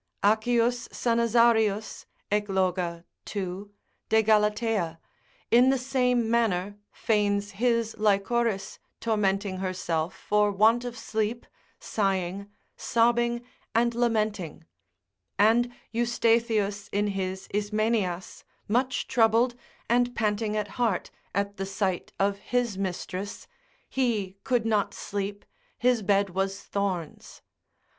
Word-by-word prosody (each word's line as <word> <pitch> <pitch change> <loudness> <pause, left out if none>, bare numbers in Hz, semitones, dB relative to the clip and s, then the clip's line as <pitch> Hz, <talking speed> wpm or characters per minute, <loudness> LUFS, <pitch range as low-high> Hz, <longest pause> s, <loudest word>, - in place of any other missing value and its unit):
Accius 235 +3 +2
Sanazarius 230 -2 +2 0.2
Egloga 185 -4 0 0.2
2. 195 0 -5 0.4
de 220 0 +4
Galatea, 210 -5 +1 0.5
in 245 +2 +6
the 270 - +3
same 250 -2 +1
manner 205 -4 0
feigns 205 -2 0
his 230 +1 0
Lychoris 210 +1 +1 0.2
tormenting 200 -3 0
herself 180 -3 -2
for 210 0 +2
want 220 +4 +4
of 240 -1 -5
sleep, 220 +1 -2 0.3
sighing, 195 -1 -1 0.3
sobbing, 240 0 +1 0.3
and 235 +1 +3
lamenting; 215 -9 -1 0.7
and 230 +4 +4 0.2
Eustathius 230 -3 +1
in 205 +1 +1
his 190 -1 -3
Ismenias 210 -3 -1 0.2
much 255 +4 0
troubled, 230 +1 +3 0.3
and 245 +1 +2
panting 215 -1 0
at 210 -1 -1
heart, 220 -7 0 0.2
at 200 0 -1
the 195 - -2
sight 195 -2 -2
of 200 0 +1
his 245 -3 -1
mistress, 190 +1 -4 0.4
he 220 -8 -1
could 245 -3 +1
not 215 -3 +1
sleep, 200 0 -4 0.3
his 245 -2 +2
bed 200 -1 +2
was 195 +2 -1
thorns. 190 -6 -4
210 Hz, 105 wpm, -27 LUFS, 195-235 Hz, 0.7 s, in